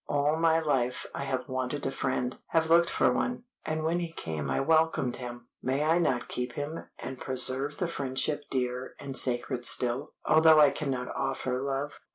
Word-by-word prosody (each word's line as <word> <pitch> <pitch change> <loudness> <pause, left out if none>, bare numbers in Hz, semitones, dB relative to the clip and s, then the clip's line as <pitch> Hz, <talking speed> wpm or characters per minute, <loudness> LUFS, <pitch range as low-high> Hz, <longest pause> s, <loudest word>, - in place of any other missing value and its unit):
All 145 +1 +2
my 165 0 +3
life 135 -6 0
I 140 - -4
have 130 -2 -2
wanted 130 +2 -3
a 135 - 0
friend, 130 -2 -1
have 160 0 +1
looked 170 0 +6
for - - +3
one, 245 -1 -1 0.2
and 155 0 -2
when 165 +2 +1
he 170 -1 -4
came 80 - -4
I - - +1
welcomed 160 -4 +2
him. 120 -1 -8
May 135 +3 0
I 165 +3 +3
not 130 -8 0
keep 125 -1 -3
him, 150 +3 -5
and 130 -1 -7
preserve 130 +2 0
the 180 - -1
friendship 145 -1 -1
dear 125 -1 -2
and 135 -2 -6
sacred 125 0 +1
still, 125 +4 +1
although 160 0 +6
I 145 -2 +7
cannot 130 -4 -3
offer 135 -2 -1
love?" 140 +1 -3
135 Hz, 185 wpm, -29 LUFS, 125-155 Hz, 0.2 s, I